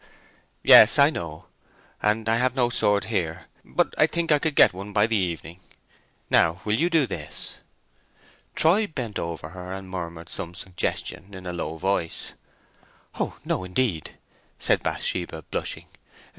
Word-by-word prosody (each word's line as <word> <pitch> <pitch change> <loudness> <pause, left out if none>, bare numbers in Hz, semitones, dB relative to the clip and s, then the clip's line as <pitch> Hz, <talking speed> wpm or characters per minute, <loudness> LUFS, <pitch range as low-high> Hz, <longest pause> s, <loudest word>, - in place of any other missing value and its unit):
"Yes, - - +8
I - - +6
know; - - -6 0.6
and 105 +1 +1
I 115 +1 +3
have 125 +1 +1
no 120 -2 +2
sword 105 -3 +2
here; 85 -7 -2 0.2
but - - 0
I 155 - +6
think 165 +1 -1
I 150 - +5
could 155 -1 -1
get - - +6
one 100 +3 -8
by 105 0 +4
the 115 0 0
evening. 85 -2 -2 0.7
Now, 85 +2 +3
will 105 - +1
you 165 +10 +2
do 165 -5 +3
this?" 80 -9 -3 1.0
Troy 195 +7 +4
bent 125 - -4
over 85 -2 -5
her 90 +1 -8
and 95 0 -6
murmured 85 -2 -6
some 85 0 -6
suggestion 95 +1 -4
in 95 -1 -10
a 90 - -4
low 80 -2 -4
voice. 95 -2 -2 0.9
"Oh - - -2
no, - - -1
indeed!" 90 - -1 0.4
said - - +1
Bathsheba, 85 -3 -2
blushing. - - -4
95 Hz, 155 wpm, -25 LUFS, 85-120 Hz, 1.0 s, Yes